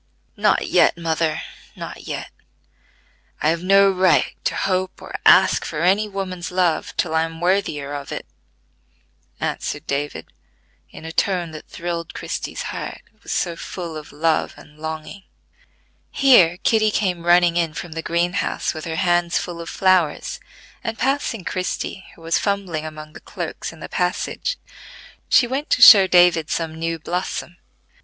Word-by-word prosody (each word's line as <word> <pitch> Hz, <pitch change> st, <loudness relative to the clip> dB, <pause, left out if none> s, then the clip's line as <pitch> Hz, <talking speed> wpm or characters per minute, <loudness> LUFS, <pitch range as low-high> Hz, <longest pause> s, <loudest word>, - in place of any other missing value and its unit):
"Not -, -, +2 dB
yet, -, -, +4 dB
mother, 160 Hz, -1 st, -1 dB, 0.3 s
not -, -, -8 dB
yet. -, -, -5 dB, 1.1 s
I 150 Hz, -, +2 dB
have 165 Hz, +1 st, 0 dB
no 195 Hz, +1 st, +5 dB
right 185 Hz, -1 st, +3 dB
to -, -, 0 dB
hope 185 Hz, -1 st, -1 dB
or -, -, -11 dB
ask -, -, +6 dB
for 155 Hz, -1 st, -4 dB
any 200 Hz, +4 st, +3 dB
woman's 185 Hz, -3 st, -5 dB
love 180 Hz, -3 st, 0 dB
till 160 Hz, -, 0 dB
I 160 Hz, -, +3 dB
am 165 Hz, 0 st, -4 dB
worthier 175 Hz, -6 st, 0 dB
of 145 Hz, -1 st, -6 dB
it," -, -, -5 dB, 1.1 s
answered 145 Hz, -, -3 dB
David 145 Hz, +1 st, -3 dB, 0.6 s
in -, -, -12 dB
a 160 Hz, -, -5 dB
tone 175 Hz, -1 st, 0 dB
that 155 Hz, -1 st, -10 dB
thrilled 170 Hz, -1 st, -5 dB
Christie's -, -, -4 dB
heart: -, -, -6 dB
it 215 Hz, -, -36 dB
was -, -, -8 dB
so 170 Hz, -2 st, -1 dB
full 170 Hz, -1 st, -7 dB
of 155 Hz, -1 st, -9 dB
love 160 Hz, +1 st, 0 dB
and 150 Hz, 0 st, -17 dB
longing. 160 Hz, +5 st, -6 dB, 0.9 s
Here 190 Hz, -11 st, +5 dB
Kitty 215 Hz, -1 st, +3 dB
came 185 Hz, -4 st, -1 dB
running 175 Hz, 0 st, +4 dB
in 165 Hz, -3 st, 0 dB
from 175 Hz, -1 st, -6 dB
the 165 Hz, +1 st, -4 dB
green 170 Hz, +2 st, 0 dB
house 200 Hz, -, -1 dB
with 155 Hz, -1 st, -7 dB
her 165 Hz, -1 st, -3 dB
hands 175 Hz, 0 st, +1 dB
full 170 Hz, -1 st, -4 dB
of 165 Hz, -, -7 dB
flowers, 185 Hz, -4 st, +1 dB, 0.4 s
and 225 Hz, 0 st, -3 dB
passing 265 Hz, -6 st, -1 dB
Christie, 185 Hz, +1 st, -4 dB
who 165 Hz, -, -17 dB
was 165 Hz, 0 st, +1 dB
fumbling 190 Hz, -6 st, -2 dB
among 155 Hz, 0 st, -10 dB
the -, -, -11 dB
cloaks -, -, -6 dB
in -, -, -15 dB
the -, -, -6 dB
passage, -, -, -2 dB, 0.7 s
she 250 Hz, -, +5 dB
went 270 Hz, +5 st, -3 dB
to -, -, +2 dB
show 195 Hz, -4 st, +10 dB
David 175 Hz, -4 st, +4 dB
some 165 Hz, -1 st, -2 dB
new 165 Hz, +1 st, -3 dB
blossom. 175 Hz, +1 st, -4 dB
175 Hz, 160 wpm, -21 LUFS, 160-190 Hz, 1.1 s, show